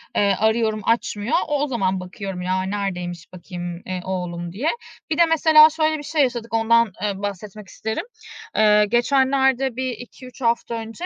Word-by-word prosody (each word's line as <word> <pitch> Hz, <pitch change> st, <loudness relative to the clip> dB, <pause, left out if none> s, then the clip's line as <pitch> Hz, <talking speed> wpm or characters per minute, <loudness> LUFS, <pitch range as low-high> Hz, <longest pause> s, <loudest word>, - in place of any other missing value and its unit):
eee, 200 Hz, -1 st, +3 dB
arıyorum 220 Hz, 0 st, +1 dB
açmıyor. 220 Hz, -1 st, 0 dB
O 295 Hz, -2 st, 0 dB
o -, -, 0 dB
zaman 195 Hz, -8 st, -1 dB
bakıyorum 185 Hz, 0 st, -6 dB
ya 185 Hz, +1 st, -1 dB
neredeymiş 185 Hz, -3 st, -4 dB
bakayım, 175 Hz, -1 st, -7 dB
eee, 185 Hz, -1 st, -4 dB
oğlum 175 Hz, -2 st, -4 dB
diye. 245 Hz, -, -1 dB, 0.4 s
Bir 310 Hz, -, -1 dB
de 340 Hz, -, +6 dB
mesela 315 Hz, -1 st, +6 dB
şöyle 315 Hz, 0 st, 0 dB
bir 295 Hz, -, -8 dB
şey 305 Hz, +1 st, 0 dB
yaşadık, 240 Hz, -3 st, -3 dB
ondan, 230 Hz, 0 st, +3 dB
eee, 200 Hz, -2 st, -2 dB
bahsetmek 205 Hz, +1 st, -6 dB
isterim. 220 Hz, +3 st, -4 dB, 0.5 s
Eee, 210 Hz, -1 st, +5 dB
geçenlerde 265 Hz, +1 st, +2 dB
bir 260 Hz, +1 st, -2 dB
2-3 250 Hz, +2 st, -11 dB
hafta 235 Hz, 0 st, 0 dB
önce, 225 Hz, +9 st, -6 dB
220 Hz, 165 wpm, -22 LUFS, 190-260 Hz, 0.5 s, de